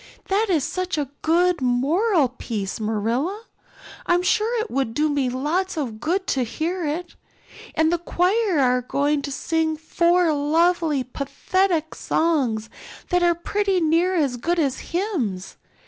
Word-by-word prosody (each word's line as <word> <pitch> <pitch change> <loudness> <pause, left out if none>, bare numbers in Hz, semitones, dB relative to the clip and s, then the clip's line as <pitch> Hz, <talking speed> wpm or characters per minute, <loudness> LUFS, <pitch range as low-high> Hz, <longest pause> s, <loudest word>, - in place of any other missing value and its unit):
That 410 +3 +2
is 320 -7 +2
such 365 +1 -2
a 285 -3 -2
good 350 0 +2
moral 285 - +2
piece, 220 -6 -5
Marilla, 230 - -1 0.6
I'm 350 0 +3
sure 445 +5 +1
it 440 0 -3
would 260 -4 -1
do 305 +1 +2
me 280 -3 0
lots 315 +9 -1
of 240 -8 -3
good 360 - -1
to 265 -7 0
hear 335 +9 -3
it. 330 +3 -4 0.6
And 320 +1 +3
the 345 - +1
choir 365 +3 +1
are 250 -2 +3
going 285 +4 0
to 280 - -5
sing 320 +2 -1
four 340 +1 +2
lovely 315 0 +2
pathetic 320 +6 -1
songs 260 -10 0 0.4
that 355 0 +2
are 345 -1 +3
pretty 390 +2 0
near 335 +3 +2
as 280 -7 +1
good 340 +8 -1
as 280 -6 0
hymns. 315 - -2
320 Hz, 145 wpm, -23 LUFS, 270-360 Hz, 0.6 s, I'm